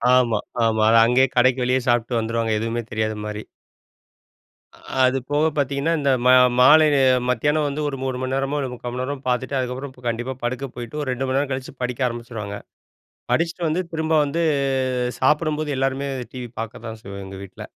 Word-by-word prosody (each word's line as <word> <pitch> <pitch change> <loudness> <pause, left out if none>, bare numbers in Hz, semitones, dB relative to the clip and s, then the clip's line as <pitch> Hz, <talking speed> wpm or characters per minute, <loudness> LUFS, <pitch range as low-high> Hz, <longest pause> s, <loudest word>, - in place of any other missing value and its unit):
ஆமா, 120 -4 +3 0.3
ஆமா. 110 -1 +1
அத 115 - +6
அங்கேயே 125 +3 +4
கடைக்கு 125 +1 +3
வெளியே 125 +1 +2
சாப்பிட்டு 120 0 +1
வந்துருவாங்க. 115 0 -1
எதுவுமே 115 +2 -2
தெரியாத 110 0 -1
மாரி. 105 0 -5 1.3
அ - - -21 0.2
அது 130 +1 +3
போக 150 +2 +2
பார்த்தீங்கன்னா, 140 +3 0
இந்த 140 -1 +1 0.2
மா 125 - +7 0.3
மாலையில 150 +3 +6 0.3
மத்தியானம் 145 +5 +1
வந்து 145 +2 -3
ஒரு 135 - -5
3 130 -1 -2
மணி 130 0 -2
நேரமோ, 135 +2 -1
இல்ல 135 -2 -2
3/4 125 0 -6
மணி 125 +1 -4
நேரமோ 135 +1 -4
பார்த்துட்டு, 130 +2 -1
அதுக்கப்பறம் 130 +2 -4
பு 125 - -18
கண்டிப்பா 120 +3 -2
படுக்க 125 +3 -2
போயிட்டு, 120 +4 -6
ஒரு 145 - -3
2 125 +1 -2
மணி 130 +1 0
நேரம் 140 0 -1
கழிச்சு 130 0 -6
படிக்க 125 +1 0
ஆரம்பிச்சிருவாங்க. 115 -4 -6 0.8
படிச்சுட்டு 165 +1 0
வந்து 165 +4 0
திரும்ப 160 0 -1
வந்து, 160 +4 -1 0.8
சாப்பிடும்போது 150 +1 +1
எல்லாருமே 135 +1 -1 0.2
டிவி 125 -2 -6
பார்க்க 115 0 -7
தான் 110 0 -7
செய்வோம் 100 0 -8
எங்க 95 0 -9
வீட்ல. 95 - -10
130 Hz, 180 wpm, -22 LUFS, 120-140 Hz, 1.3 s, மா